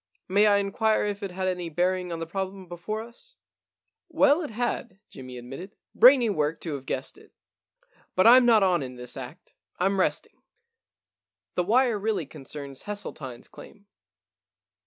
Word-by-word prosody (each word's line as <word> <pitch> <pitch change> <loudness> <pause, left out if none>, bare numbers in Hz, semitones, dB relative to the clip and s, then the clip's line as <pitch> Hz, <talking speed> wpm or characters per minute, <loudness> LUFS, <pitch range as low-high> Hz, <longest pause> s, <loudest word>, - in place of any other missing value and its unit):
May 205 +3 +4
I 205 -1 +5
inquire 210 +2 +1
if 205 0 -3
it 200 - -3
had 185 +1 -3
any 180 -2 -2
bearing 180 +2 0
on 165 - -4
the 165 - -3
problem 190 +2 -5
before 175 +6 -5
us? 355 - -12 0.2
' - - -67
* - - -57
Well, 295 0 +4
it 310 - -5
had,* 235 -2 -3
Jimmy 130 -2 -9
admitted. 135 - -9
* - - -66
Brainy 250 -1 +7
work 155 -5 -1
to 160 - -4
have 135 -2 -7
guessed - - -4
it. - - -20 0.8
But 185 - +3
Fm 250 +2 +8
not 225 -4 +5
on 180 -4 +2
in 130 -1 -6
this 125 0 -6
act 130 +3 -10
— - - -38
Fm 195 +2 +1
resting. - - -1 1.1
The 180 - 0
wire 235 +1 +3
really 210 -5 -1
con 135 - -13
cerns 140 -2 -7
Hesseltine*s 155 -12 -6
claim. 200 -1 -14
190 Hz, 180 wpm, -26 LUFS, 165-220 Hz, 1.1 s, Fm